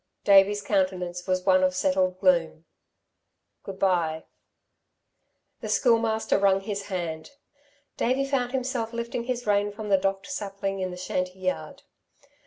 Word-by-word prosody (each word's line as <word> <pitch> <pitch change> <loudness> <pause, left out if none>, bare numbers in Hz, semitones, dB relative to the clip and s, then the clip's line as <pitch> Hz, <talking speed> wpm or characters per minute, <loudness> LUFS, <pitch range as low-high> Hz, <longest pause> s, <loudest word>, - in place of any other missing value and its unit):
Davey's 200 +1 +5
countenance 185 -3 -1
was 185 -1 0
one 185 -1 +4
of 185 0 +2
settled 185 0 +1
gloom. 170 -4 +2 1.0
"Good 195 -1 -8
bye." 170 -5 +1 1.4
The - - -6
Schoolmaster 225 -4 +2
wrung 195 -1 +3
his 200 0 -5
hand. 170 -5 -4 0.7
Davey 260 +3 +1
found 260 -3 -1
himself 250 -3 -2
lifting 235 0 -4
his 245 -1 -3
rein 205 0 +1
from 210 0 -7
the 195 -1 +4
docked 195 +1 -1
sapling 195 -1 -4
in 185 -1 -2
the 180 - -8
shanty 180 0 -3
yard. 185 -5 -4
195 Hz, 135 wpm, -26 LUFS, 185-215 Hz, 1.4 s, Davey's